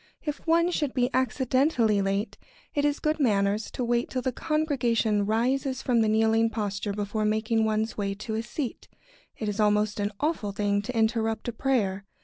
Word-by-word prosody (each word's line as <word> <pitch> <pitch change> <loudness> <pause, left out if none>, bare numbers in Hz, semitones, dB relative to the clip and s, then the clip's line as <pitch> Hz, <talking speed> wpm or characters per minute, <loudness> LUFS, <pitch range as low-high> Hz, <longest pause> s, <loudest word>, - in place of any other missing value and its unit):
If 295 -1 -3
one 335 +2 +3
should 295 -6 -1
be 250 0 +1
accidentally 255 -3 +2
late, 195 +3 -1 0.4
it 290 0 +1
is 290 0 +1
good 310 +1 0
manners 205 -4 +1
to 250 - -4
wait 240 0 0
till 255 -1 -3
the 260 - 0
congregation 240 -9 0
rises 260 +4 0
from 240 -3 +2
the 220 - +2
kneeling 225 +1 +3
posture 205 -2 -3
before 205 +1 -2
making 220 +1 +1
one's 220 0 -1
way 200 -1 -1
to 215 +2 -6
a 220 - -1
seat. 240 +2 -5 0.5
It 215 - -4
is 210 +1 -3
almost 210 0 +2
an 205 0 -1
awful 290 -10 -1
thing 205 0 0
to 230 +4 -5
interrupt 225 0 0
a - - -5
prayer. 205 -7 0
225 Hz, 180 wpm, -27 LUFS, 210-260 Hz, 0.5 s, one